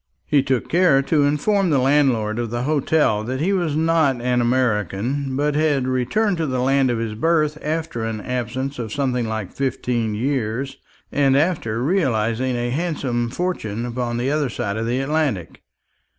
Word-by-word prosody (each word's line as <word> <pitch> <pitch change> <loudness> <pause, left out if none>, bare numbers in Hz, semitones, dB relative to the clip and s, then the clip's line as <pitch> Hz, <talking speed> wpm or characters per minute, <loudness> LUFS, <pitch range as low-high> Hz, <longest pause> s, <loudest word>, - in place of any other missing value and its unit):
He 145 - +3
took 130 -2 -1
care 170 -6 +4
to 145 +1 +2
inform 185 +7 +1
the 145 - +3
landlord 130 -5 +2
of 120 -1 -2
the 120 +2 -2
hotel 145 -6 +1
that 130 +2 -3
he 185 +7 +1
was 170 -6 0
not 160 -5 +2
an 125 0 +1
American, 120 - 0
but 145 +2 +1
had 145 -4 +1
returned 175 - +1
to 160 -1 -1
the 130 -1 -1
land 135 +1 +2
of 120 - 0
his 115 -1 -3
birth 155 +4 +1
after 155 -5 -3
an 110 -1 -3
absence 125 +3 -3
of 110 -3 -4
something 125 -4 -1
like 110 -3 -4
fifteen 120 -4 -1
years, 130 +2 -2 0.3
and 140 -1 +3
after 140 -8 0
realizing 130 - +1
a 120 0 -2
handsome 130 -6 -1
fortune 120 - -3
upon 120 -1 -3
the 125 +3 0
other 150 -3 0
side 100 -3 -3
of 110 +1 -2
the 125 +2 0
Atlantic. 135 - -1
130 Hz, 170 wpm, -21 LUFS, 120-150 Hz, 0.3 s, care